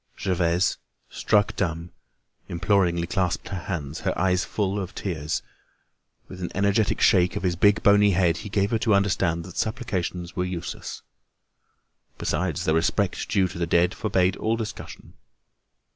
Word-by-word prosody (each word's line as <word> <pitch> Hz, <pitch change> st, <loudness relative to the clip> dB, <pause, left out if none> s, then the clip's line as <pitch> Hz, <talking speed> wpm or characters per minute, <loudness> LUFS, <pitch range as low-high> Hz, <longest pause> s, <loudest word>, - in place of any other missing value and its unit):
Gervaise, 90 Hz, 0 st, +1 dB, 0.3 s
struck 105 Hz, -2 st, +1 dB
dumb, 85 Hz, 0 st, -2 dB, 0.6 s
imploringly 85 Hz, -1 st, +1 dB
clasped 95 Hz, -4 st, -1 dB
her 95 Hz, -, -4 dB
hands, 80 Hz, -5 st, -4 dB
her -, -, -2 dB
eyes 90 Hz, 0 st, +2 dB
full 100 Hz, -1 st, -1 dB
of 95 Hz, -1 st, -6 dB
tears. 80 Hz, -6 st, -3 dB, 0.8 s
With 95 Hz, 0 st, -10 dB
an 90 Hz, -, -3 dB
energetic 100 Hz, +2 st, +1 dB
shake 90 Hz, +1 st, +4 dB
of 100 Hz, -, -3 dB
his 90 Hz, -2 st, +1 dB
big 100 Hz, +4 st, +3 dB
bony 105 Hz, 0 st, +6 dB
head, 85 Hz, -2 st, +2 dB
he 105 Hz, -, -7 dB
gave 100 Hz, +2 st, 0 dB
her 115 Hz, -, +1 dB
to 110 Hz, -2 st, +3 dB
understand 90 Hz, -4 st, +1 dB
that 90 Hz, -, -11 dB
supplications 95 Hz, -7 st, -3 dB
were 90 Hz, -, 0 dB
useless. 90 Hz, -2 st, -5 dB, 1.1 s
Besides, 90 Hz, -5 st, -1 dB
the 80 Hz, -, +2 dB
respect 90 Hz, +4 st, 0 dB
due 95 Hz, -3 st, +2 dB
to 85 Hz, -, -8 dB
the 85 Hz, -, 0 dB
dead 85 Hz, +2 st, +3 dB
forbade 95 Hz, -3 st, +1 dB
all 110 Hz, +1 st, 0 dB
discussion. 110 Hz, -2 st, -7 dB
95 Hz, 150 wpm, -25 LUFS, 85-100 Hz, 1.1 s, bony